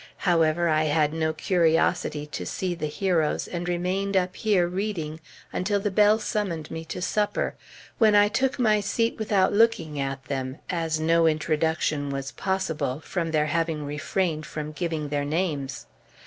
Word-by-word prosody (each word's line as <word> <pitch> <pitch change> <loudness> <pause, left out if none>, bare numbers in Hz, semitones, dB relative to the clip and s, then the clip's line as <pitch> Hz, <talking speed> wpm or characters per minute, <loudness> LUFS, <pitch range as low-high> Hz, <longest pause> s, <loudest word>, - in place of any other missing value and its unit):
However, 170 -1 +3
I 155 -1 +2
had 150 0 +2
no 160 -1 0
curiosity 165 -3 +1
to 150 - -6
see 185 -2 -2
the 160 -3 -3
heroes, 165 -1 0
and 175 0 -4
remained 190 +3 0
up 185 0 0
here 200 -5 +2
reading 175 -5 -3 0.3
until 200 +2 0
the 205 0 -1
bell 210 +2 +5
summoned 195 -8 -3
me 160 - -5
to 180 +2 -5
supper, 210 +2 0 0.5
when 215 -3 +5
I 205 0 +6
took 260 +5 0
my 215 -4 +3
seat 225 +3 -1
without 205 -3 +2
looking 200 -9 +2
at 135 0 -3
them, 130 -1 -3
as 165 -3 -1
no 165 +1 +3
introduction 155 -1 0
was 135 0 -4
possible, 175 -8 -2
from 170 0 -3
their 155 -1 +2
having 160 -1 -1
refrained 155 +2 -2
from 150 0 -5
giving 155 -1 -3
their 145 0 -1
names. 145 -5 -2
165 Hz, 160 wpm, -26 LUFS, 155-190 Hz, 0.5 s, I